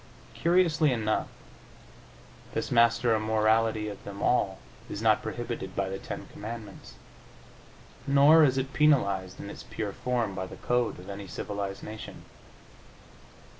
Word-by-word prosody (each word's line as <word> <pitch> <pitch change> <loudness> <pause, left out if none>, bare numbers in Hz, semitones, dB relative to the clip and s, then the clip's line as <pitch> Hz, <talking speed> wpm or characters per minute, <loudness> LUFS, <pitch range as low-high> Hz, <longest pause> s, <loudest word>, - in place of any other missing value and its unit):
Curiously 165 -4 +3
enough, 110 -3 0 1.3
this - - -2
master 115 -1 +4
immorality 110 0 +2
of 100 -1 -7
them 100 0 -7
all 95 -6 +2 0.3
is 100 - -5
not 110 -1 +3
prohibited 120 -5 -5
by 95 -1 -1
the 95 0 -4
Ten - - -7
Commandments, 110 -2 -8 1.1
nor 145 +3 +7
is 135 -3 +3
it 135 +1 -2
penalized, 100 -12 +2
in - - -7
its - - -9
pure 105 -3 -5
form, 120 -5 -1
by 95 -1 -4
the - - -10
code 120 -1 0
of 90 - -12
any 100 0 -7
civilized 100 +2 -5
nation. 110 0 -8
110 Hz, 130 wpm, -28 LUFS, 100-125 Hz, 1.3 s, nor